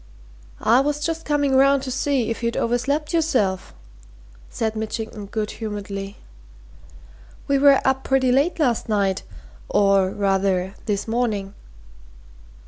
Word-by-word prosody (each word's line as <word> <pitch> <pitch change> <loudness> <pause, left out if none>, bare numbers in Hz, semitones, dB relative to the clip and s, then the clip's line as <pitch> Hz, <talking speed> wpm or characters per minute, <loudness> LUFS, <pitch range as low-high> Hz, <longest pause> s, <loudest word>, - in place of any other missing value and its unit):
"I 235 +3 +5
was 295 +2 0
just 330 0 -3
coming 285 -2 +1
round 275 0 +4
to 260 - -4
see 265 -2 0
if 230 - -4
you'd 235 0 -1
overslept 280 +7 -1
yourself," 250 - 0 0.8
said 220 -1 -2
Mitchington 220 -1 -5
good 210 +1 -3
humouredly. 200 -2 -6 1.3
"We 280 -1 +2
were 280 -1 +6
up 265 0 +1
pretty 265 -1 +2
late 280 +7 +2
last 250 -8 0
night, 200 -3 +1 0.5
or, 195 -2 +3
rather, 195 -1 0
this 205 0 -1
morning." 220 -4 -1
230 Hz, 125 wpm, -22 LUFS, 200-275 Hz, 1.3 s, were